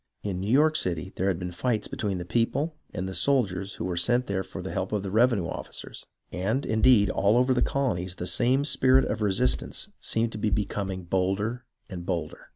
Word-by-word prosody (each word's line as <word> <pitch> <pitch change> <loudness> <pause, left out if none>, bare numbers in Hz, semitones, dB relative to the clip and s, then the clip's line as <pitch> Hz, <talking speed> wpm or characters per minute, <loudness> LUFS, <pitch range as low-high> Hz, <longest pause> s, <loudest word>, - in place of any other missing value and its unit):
In 95 -3 -2
New 100 +3 -3
York 155 +4 +4
City, 90 +1 -2
there 95 - 0
had 95 -4 +1
been 90 0 -5
fights 110 +4 -1
between 105 -8 -2
the 90 - -5
people 135 - 0 0.2
and 95 - -4
the 95 - -5
soldiers 100 -8 0
who - - -4
were 90 -1 -2
sent 120 +8 +2
there 100 -3 -1
for 95 0 -7
the 95 - -5
help 95 - -2
of 105 -2 -1
the 95 - -4
revenue 110 -3 +3
officers, - - -7 0.2
and, 110 +10 -1
indeed, 110 -3 +4
all 105 +4 +3
over 125 +1 +4
the 125 - +1
colonies 90 -10 0
the 90 - -5
same 130 +8 +2
spirit 130 -2 +4
of 110 +1 -2
resistance 95 -11 0
seemed 115 0 0
to 110 - -6
be 105 - +1
becoming 95 -1 -2
bolder 95 +7 -1 0.2
and 90 -4 -7
bolder. 85 -4 -4
100 Hz, 205 wpm, -27 LUFS, 95-120 Hz, 0.2 s, York